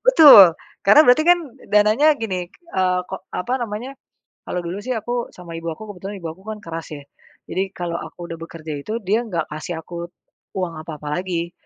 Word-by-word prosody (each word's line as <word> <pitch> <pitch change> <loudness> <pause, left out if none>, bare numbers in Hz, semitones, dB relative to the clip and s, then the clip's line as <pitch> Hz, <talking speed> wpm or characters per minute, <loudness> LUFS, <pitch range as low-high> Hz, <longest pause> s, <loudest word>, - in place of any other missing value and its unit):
Betul, 280 - +9 0.3
karena 205 +9 +8
berarti 280 +5 +5
kan 355 - +6 0.3
dananya 210 +8 +4
gini, 185 -7 -3
eee, 185 - -1
ko - - -5
apa 245 +8 -4
namanya 235 +3 -4 0.5
kalau 180 - -3
dulu 175 +3 -4
sih 255 - -4
aku 240 +1 -3
sama 170 -2 -10
ibu 165 0 -4
aku 215 - -8
kebetulan 195 +3 -7
ibu 170 - -6
aku 190 +3 -21
kan 215 - -7
keras 165 0 -6
ya. 145 - -9 0.5
Jadi 185 - -2
kalau 175 -2 -4
aku - - -10
udah 165 -1 -6
bekerja 160 -1 -8
itu, 140 - -8 0.2
dia 210 +4 +3
nggak 170 -6 -2
kasih 160 +2 -5
aku 170 +1 -7 0.5
uang 180 -3 -2
apa-apa 155 -2 -8
lagi. 175 -2 -3
185 Hz, 185 wpm, -21 LUFS, 170-220 Hz, 0.5 s, Betul